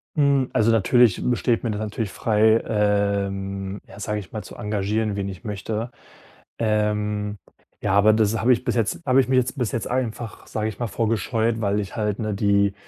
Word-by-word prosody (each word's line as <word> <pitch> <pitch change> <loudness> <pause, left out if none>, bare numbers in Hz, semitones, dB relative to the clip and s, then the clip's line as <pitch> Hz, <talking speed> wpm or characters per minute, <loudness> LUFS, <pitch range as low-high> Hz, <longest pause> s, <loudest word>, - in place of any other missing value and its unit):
Hm. 140 -3 +3
Also 110 +1 +3
natürlich 115 0 +4
be 125 - +2
steht 120 -1 0
mir 115 - -1
das 105 - -3
natürlich 110 -1 -3
frei, 110 +2 +3
ähm, 100 -2 -1
ja, 95 - -13
sage 105 +1 -2
ich 95 - -11
mal, 110 -2 -5
zu - - -11
engagieren, 105 +1 -1
wen 100 -1 -3
ich 95 -2 -9
möchte. 110 +3 -4 0.7
Ähm, 105 -1 0 0.4
ja, - - 0
aber 105 +2 +5
das 110 0 +2
habe 125 +2 +4
ich 115 - -2
bis - - -1
jetzt 105 -7 0
habe 130 +1 +4
ich 130 - +3
mich 130 0 +2
jetzt 125 +3 0
bis 120 -6 -1
jetzt 115 - -2
einfach, 120 -3 -3
sage 110 0 -2
ich 105 - -9
mal, 120 - -1
vor 115 +1 -1
gescheut, 115 +1 0
weil 100 0 +1
ich 100 -2 -5
halt, 105 -2 -1
ne, 110 -2 -2
die 100 0 +2
105 Hz, 205 wpm, -23 LUFS, 100-115 Hz, 0.7 s, aber